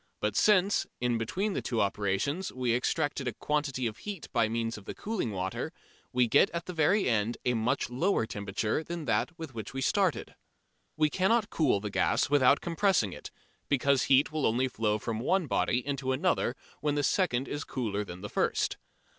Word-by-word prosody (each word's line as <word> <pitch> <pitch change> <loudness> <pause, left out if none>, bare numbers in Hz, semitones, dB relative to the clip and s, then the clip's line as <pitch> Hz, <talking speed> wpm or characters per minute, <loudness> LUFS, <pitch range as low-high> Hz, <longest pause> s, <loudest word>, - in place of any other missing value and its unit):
But 105 -1 -1
since, 200 - +3
in 120 -2 0
between 190 - -1
the - - -2
two 115 - -2
operations 100 - 0
we 125 -2 -1
extract 145 +5 0
a 125 -3 -3
quantity 145 -1 -1
of 110 -2 -3
heat 205 -5 -7
by 115 -3 +2
means 115 0 -2
of 105 - -11
the - - -6
cooling 215 - -2
water, 95 -2 -3 0.4
we 125 -1 +3
get 145 - +5
at 170 +1 -3
the - - -5 0.4
end 115 -1 +1
a 125 - +3
very - - 0
much 115 - 0
lower 160 - +1
temperature 105 +6 -2
than 170 -1 -5
that 175 +3 0
with 160 -5 -7
which 110 +2 -7
we 135 - -2
started. 190 +3 +1 0.6
We 155 -1 +3
cannot 205 +5 +2
cool 140 -10 +2
the 105 0 -5
gas 140 - +1
without 140 -1 +5
compressing 170 - +1
it, - - -9 0.4
because 140 -1 +3
heat 135 +3 +4
will 155 -2 +1
only 125 +4 +1
flow 110 -4 0
from 110 0 -4
one 185 +9 +1
body 125 -2 0
into 135 -2 -1
another 135 -4 +1 0.2
when 150 -1 0
the 145 - 0
second 135 -7 +1
is 145 - -4
cooler 105 -5 -2
than 90 -2 -9
the 105 - -6
first. - - 0
130 Hz, 190 wpm, -29 LUFS, 110-160 Hz, 0.6 s, get